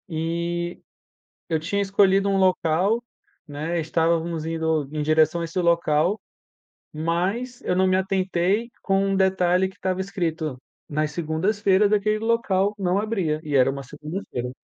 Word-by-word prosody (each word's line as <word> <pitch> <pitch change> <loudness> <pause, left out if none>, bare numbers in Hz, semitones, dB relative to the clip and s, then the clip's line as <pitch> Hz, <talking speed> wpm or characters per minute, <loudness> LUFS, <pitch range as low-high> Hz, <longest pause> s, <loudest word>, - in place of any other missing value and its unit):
E, 170 +1 -3 0.7
eu 160 - +1
tinha 200 +5 -1
escolhido 195 0 +3
um 195 - +2
local, 185 +4 +2 0.4
né, 155 +4 -3
estávamos 165 0 0
indo 160 -3 -1
em 155 -1 -2
direção 155 +2 +3
a - - -2
esse 165 +2 -4
local, 170 +3 +2 0.7
mas 185 +11 -2
eu 180 - -1
não 190 +1 +3
me 185 - +3
atentei 190 +3 0
com 195 0 +1
um 195 0 +1
detalhe 190 -1 +2
que 190 - -18
estava 185 0 -2
escrito, 165 -7 -3 0.3
nas 150 0 -1
segundas-feiras 190 +6 +1
aquele 215 +1 +2
local 210 -3 +1
não 185 -1 0
abria, 190 -8 -1
e 150 -3 -3
era 130 -1 +5
uma 140 0 -4
segunda-feira. 150 -3 -6
175 Hz, 145 wpm, -24 LUFS, 160-195 Hz, 0.7 s, era